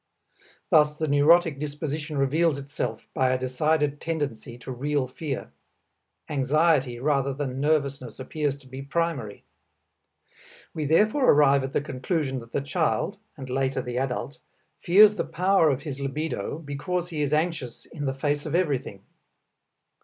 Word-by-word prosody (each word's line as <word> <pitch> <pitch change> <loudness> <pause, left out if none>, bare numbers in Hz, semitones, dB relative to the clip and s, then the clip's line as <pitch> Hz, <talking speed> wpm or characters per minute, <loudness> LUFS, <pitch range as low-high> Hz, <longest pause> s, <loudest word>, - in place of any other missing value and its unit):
Thus 150 -2 +4
the 155 - -1
neurotic 150 +1 +4
disposition 150 +1 -4
reveals 150 +3 +2
itself 140 -5 -5
by 130 -1 +2
a 130 - +2
decided 145 +3 0
tendency 135 -8 -4
to 125 - -8
real 140 +1 -1
fear; 135 +1 -5 0.8
anxiety 145 -2 +2
rather 140 0 0
than 135 -2 -3
nervousness 140 -5 0
appears 145 +1 -2
to 140 -2 -18
be 130 +1 -8
primary. 140 -7 -2 1.3
We 155 - -3
therefore 215 - +3
arrive 140 -2 +5
at 135 +1 -5
the - - +1
conclusion 135 0 -2
that 115 -1 -13
the - - -1
child 160 +7 -1 0.2
(and 135 -2 -7
later 130 0 -1
the 125 0 -3
adult) 135 +3 -3 0.4
fears 205 +4 +7
the - - 0
power 185 -3 +2
of 135 0 -1
his 140 -4 -5
libido 140 -3 -3
because 165 +4 -3
he 155 -3 -3
is 145 -1 0
anxious 155 -6 -1
in 145 -3 -6
the 135 -1 -1
face 145 +2 -1
of 155 - -2
everything. 135 - -1
145 Hz, 145 wpm, -26 LUFS, 130-155 Hz, 1.3 s, fears